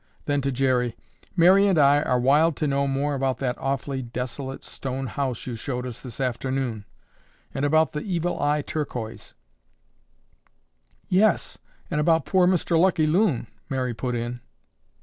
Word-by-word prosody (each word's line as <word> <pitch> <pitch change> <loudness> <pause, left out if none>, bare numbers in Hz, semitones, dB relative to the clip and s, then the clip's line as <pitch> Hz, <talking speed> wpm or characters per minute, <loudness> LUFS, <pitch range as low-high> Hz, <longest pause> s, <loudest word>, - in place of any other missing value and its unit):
Then 145 -1 +1
to 140 0 -1
Jerry, 125 -2 +1 0.4
"Mary 190 +3 +6
and 190 -4 +2
I 145 0 +5
are 125 -4 +1
wild 145 +5 +4
to 155 - -2
know 140 -1 +1
more 140 +2 0
about 135 -2 0
that 125 -1 -1
awfully 135 0 -2
desolate 130 +2 -5
stone 135 0 -5
house 130 -2 -3
you 125 - -4
showed 125 +2 -4
us 125 -3 -7
this 125 -1 -8
afternoon 125 -3 -2 0.7
and 135 - -3
about 155 +2 +3
the 150 - -4
Evil 175 -3 -2
Eye 145 0 +1
Turquoise—" 120 -9 -5 1.7
"Yes, 200 +3 +2 0.3
and 150 - +1
about 160 +1 +3
poor 185 -2 +3
Mr. 175 -2 +2
Lucky 170 -3 +3
Loon—" 160 - +2 0.2
Mary 130 -3 -1
put 125 +2 -3
in. 120 +1 -4
135 Hz, 150 wpm, -25 LUFS, 125-155 Hz, 1.7 s, Mary